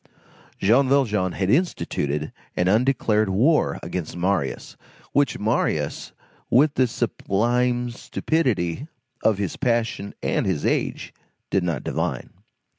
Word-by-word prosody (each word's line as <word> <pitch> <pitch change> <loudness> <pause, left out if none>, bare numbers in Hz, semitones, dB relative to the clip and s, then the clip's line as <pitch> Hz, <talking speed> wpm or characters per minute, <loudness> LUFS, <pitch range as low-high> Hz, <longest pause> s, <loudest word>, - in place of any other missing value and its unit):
Jean 130 +6 +3
Valjean 105 -10 +2
had 95 0 0
instituted 75 - 0 0.2
an 90 - +2
undeclared 110 -1 +2
war 130 +12 +2
against 90 -2 -4
Marius, 90 -5 -1 0.4
which 140 -5 +2
Marius, 110 +2 -1 0.4
with 140 +4 +4
the 130 - +3
sublime 120 +2 0
stupidity 125 - -1 0.4
of 110 -3 +3
his 100 -4 -3
passion 115 -5 -1
and - - 0
his 85 -6 -1
age, - - -1 0.4
did 95 - +2
not 85 -7 -2
divine. - - -3
110 Hz, 115 wpm, -23 LUFS, 95-125 Hz, 0.4 s, with